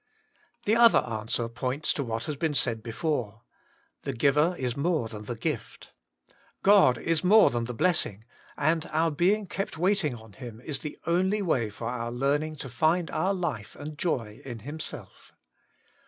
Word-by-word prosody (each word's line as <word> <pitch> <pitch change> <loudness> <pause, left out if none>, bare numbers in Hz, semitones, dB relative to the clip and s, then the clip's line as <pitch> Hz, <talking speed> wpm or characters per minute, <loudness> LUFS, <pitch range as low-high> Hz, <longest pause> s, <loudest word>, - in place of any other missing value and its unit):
The 215 - +3
other 235 -1 +7
answer 115 0 -2
points 130 +5 -1
to 140 - -2
what 115 -2 -3
has 150 -1 -3
been 155 +1 -1
said 115 -5 +1
before. 115 -2 -3 0.6
The 140 - -3
giver 150 +7 +3
is 125 -2 -2
more 155 -4 0
than 105 -1 -8
the 120 - -4
gift; 115 - -4 0.7
God 195 - +6
is 165 +4 0
more 210 +4 +6
than 120 -1 -1
the 125 0 -5
blessing; 115 - +1 0.3
and 155 +2 +1
our 160 +1 +1
being 195 +7 +2
kept 195 -3 -4
waiting 180 -6 +1
on 110 -2 -13
Him 120 -3 -9
is 140 0 -3
the 150 - -7
only 190 +5 +1
way 125 - +1
for 105 +3 -8
our 120 -1 -3
learning 145 +5 0
to 135 - -6
find 160 +7 +1
our 195 +2 +1
life 145 - -4
and 150 +1 -7
joy 115 -10 -2
in 120 -4 -7
Himself. 150 +6 -7
145 Hz, 170 wpm, -28 LUFS, 115-170 Hz, 0.7 s, other